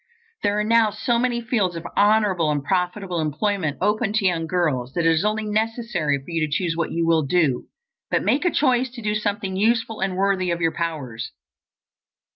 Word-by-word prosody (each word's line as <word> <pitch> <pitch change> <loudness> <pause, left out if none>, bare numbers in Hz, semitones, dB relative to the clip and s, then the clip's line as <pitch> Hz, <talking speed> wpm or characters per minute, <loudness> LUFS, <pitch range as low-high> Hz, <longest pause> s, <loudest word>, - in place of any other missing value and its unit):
There 205 +1 +1
are - - +1
now 225 0 +4
so 225 +3 0
many 240 -1 0
fields 215 -7 0
of 165 0 -6
honorable 205 -6 +3
and 145 -2 -1
profitable 180 +2 -1
employment 160 +1 -1
open 210 0 +1
to 215 -2 +1
young 165 -3 +1
girls 145 -8 -1
that 170 -2 0
it 165 - +5
is 160 +2 +1
only 215 +1 0
necessary 215 - -1
for 135 - -13
you 165 -2 -1
to - - -13
choose 165 +1 0
what 170 0 -2
you 165 0 0
will 165 -1 +3
do. 150 -3 +1 0.4
But - - +1
make 285 - +2
a 355 - +3
choice 260 -5 +2
to 235 - -7
do 210 0 0
something 205 -2 -2
useful 225 +2 +1
and 190 -1 -1
worthy 190 -2 +1
of 170 0 -1
your 165 -1 +1
powers. 140 -9 -4
190 Hz, 200 wpm, -23 LUFS, 165-215 Hz, 0.4 s, it